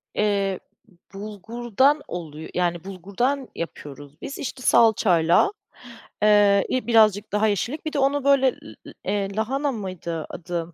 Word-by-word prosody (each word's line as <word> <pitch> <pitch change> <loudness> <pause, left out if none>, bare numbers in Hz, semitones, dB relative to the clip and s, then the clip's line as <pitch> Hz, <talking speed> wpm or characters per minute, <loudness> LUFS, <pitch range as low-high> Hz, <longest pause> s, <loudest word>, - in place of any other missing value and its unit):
Eee, 200 -2 0 0.5
bulgurdan, 230 +7 0
oluyo 160 -3 -7
yani, 175 -2 -1
bulgurdan 200 +9 -2
yapıyoruz 145 -3 -8
biz, 275 - -6
işte 265 -1 -6
salçayla, 185 - +4 0.7
eee, 205 -1 +5
i 255 -1 -1
birazcık 215 -3 +4
daha 210 +1 +2
yeşillik, 235 - -2
bir 310 - -3
de 290 - 0
onu 275 +1 +1
böyle, 275 -1 +4
l - - -15 0.3
l - - -9
eee, 200 -1 -2
lahana 270 +6 0
mıydı 185 -7 -5
adı? 170 -1 -5
205 Hz, 135 wpm, -23 LUFS, 175-245 Hz, 0.7 s, eee